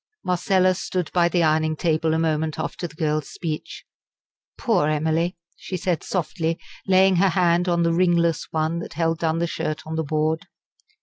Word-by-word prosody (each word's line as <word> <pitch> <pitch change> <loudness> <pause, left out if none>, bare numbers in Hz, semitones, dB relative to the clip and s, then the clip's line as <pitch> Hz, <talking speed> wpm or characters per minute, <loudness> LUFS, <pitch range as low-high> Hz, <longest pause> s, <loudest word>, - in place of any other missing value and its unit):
Marcella 185 +1 +2
stood 180 -1 -3
by 175 -1 +3
the 175 -1 +2
ironing 155 0 +2
table 160 -1 +1
a - - +1
moment 160 -1 0
after 165 +2 -4
the 155 - -17
girl's 155 -2 -1
speech. 155 -3 -6 0.7
"Poor 190 - +2
Emily!" 160 +4 0 0.2
she 185 - -5
said 175 -1 -1
softly, 165 -2 -2 0.3
laying 190 -1 +5
her 195 +2 +4
hand 175 0 +2
on 170 -1 +2
the 165 0 +2
ringless 170 -2 +2
one 160 +1 -1
that 170 - -7
held 165 +1 0
down 160 -1 0
the 170 - +1
shirt 155 -2 -4
on 160 +1 -4
the 160 - 0
board. 155 +3 -1
165 Hz, 175 wpm, -23 LUFS, 155-180 Hz, 0.7 s, laying